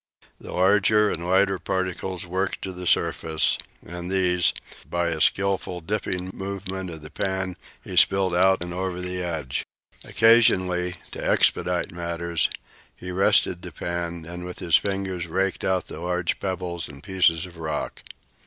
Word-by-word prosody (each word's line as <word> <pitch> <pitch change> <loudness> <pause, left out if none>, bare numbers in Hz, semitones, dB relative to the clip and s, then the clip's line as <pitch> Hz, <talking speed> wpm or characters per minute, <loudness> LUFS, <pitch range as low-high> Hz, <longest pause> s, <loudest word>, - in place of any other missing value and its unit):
The - - -9
larger 105 +3 +4
and 85 - -3
the 85 - -4
lighter 95 +1 +3
particles 95 -1 -3
worked 95 +2 -2
to 95 - -3
the 90 0 -6
surface, 80 -2 +2 0.3
and 90 +1 -6
these, 90 -5 +3 0.4
by 85 0 0
a 80 -2 -2
skilful 95 -2 +1
dipping 95 0 -2
movement 95 -1 -5
of 80 -2 -8
the 75 - -10
pan, 95 -2 -2 0.3
he - - -7
spilled 95 -2 +4
out 95 0 +4
and 90 0 -6
over 90 0 -3
the 90 0 -3
edge. 80 -7 -2 0.4
Occasionally, 95 -6 +4 0.2
to - - -6
expedite 90 -1 +2
matters, 85 -1 -1 0.5
he 90 - -7
rested 90 -1 +3
the 90 - -8
pan 85 0 -4
and 90 +1 -7
with 90 0 -7
his 85 -3 +2
fingers 95 -2 0
raked 95 +3 -1
out 95 -1 +1
the - - -8
large 90 0 -1
pebbles 90 -3 -3
and 70 0 -12
pieces 90 -3 +2
of 85 -2 -13
rock. 80 -1 -3
90 Hz, 155 wpm, -25 LUFS, 85-95 Hz, 0.5 s, larger